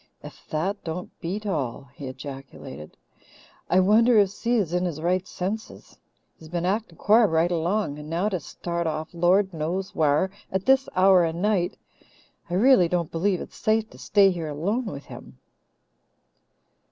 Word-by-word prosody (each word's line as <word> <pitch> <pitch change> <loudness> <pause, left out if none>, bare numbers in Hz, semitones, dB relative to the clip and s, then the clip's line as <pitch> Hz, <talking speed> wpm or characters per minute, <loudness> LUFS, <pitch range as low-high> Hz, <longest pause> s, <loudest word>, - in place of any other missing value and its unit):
"Ef - - -12
that 190 +7 -2
don't 175 +2 -5
beat 195 +5 -4
all!" 140 - -3
he 140 - -8
ejaculated. 130 - -9 0.7
"I 185 - +4
wonder 220 +5 +5
if 200 -2 +4
Si 235 +4 -1
is 190 -7 0
in 180 +1 +1
his 165 -4 -3
right 180 +3 0
senses? 205 +5 -6 0.4
He's 160 - -14
been 175 +1 -2
actin' 195 -3 -2
quar 220 +2 +5
right 165 0 +1
along, 170 -2 -1
and 150 0 -9
now 170 +5 0
to 185 -4 -2
start 170 +4 -4
off, 155 +1 -4
Lord 185 +3 +2
knows 170 +5 -3
whar, 155 +4 +2 0.2
at 190 0 -2
this 265 0 +3
hour 185 -1 +6
o' 165 - +1
night! 180 +1 0 0.7
I 175 - -1
really 215 -3 +5
don't 170 -2 -1
believe 180 +2 0
it's - - -10
safe 220 0 0
to - - -15
stay 200 -2 +4
here 165 -3 -4
alone 200 - -2
with 140 -8 -7
him." - - -12
180 Hz, 165 wpm, -25 LUFS, 160-200 Hz, 0.7 s, hour